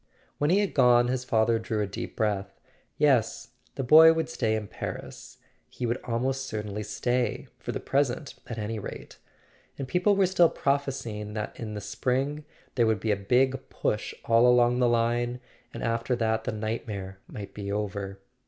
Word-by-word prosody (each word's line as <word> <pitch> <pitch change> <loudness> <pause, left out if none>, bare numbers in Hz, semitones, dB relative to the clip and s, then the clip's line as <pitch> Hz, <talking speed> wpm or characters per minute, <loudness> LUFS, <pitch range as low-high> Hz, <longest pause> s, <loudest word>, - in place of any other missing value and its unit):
When 145 - +2
he 195 +4 +4
had 205 - -1
gone 125 -3 +5
his 125 0 -1
father 115 -1 +2
drew 110 -1 -3
a 105 - +1
deep 100 - -6
breath. 100 -3 -2 0.4
Yes—the 135 - 0
boy 160 +5 +9
would 160 0 -2
stay 110 -3 0
in 110 -1 -3
Paris; - - -7 0.3
he 125 - -4
would 120 +2 -1
almost 130 +3 -1
certainly 105 -1 -4
stay; 120 +4 -1
for - - -4
the - - -3
present, 140 +1 -1
at 115 - -6
any 110 +1 -3
rate. - - -9 0.6
And 135 - -4
people 180 +8 +2
were 195 -1 +4
still 175 -2 +4
prophesying 130 -7 -2
that 105 -1 -3
in 110 -2 -5
the 105 - -4
spring 130 +8 -1 0.3
there 120 -3 +3
would 110 -2 +2
be 110 +2 0
a - - +3
big 125 +7 +1
push 105 - -2
all 115 +1 +5
along 125 0 +4
the 125 -1 +4
line; 120 +1 +1 0.3
and - - -7
after 115 +2 0
that 110 -1 0
the - - -1
nightmare 105 -3 -4
might 100 -2 -8
be 100 -1 -5
over. 100 -1 -3
115 Hz, 175 wpm, -27 LUFS, 105-130 Hz, 0.6 s, boy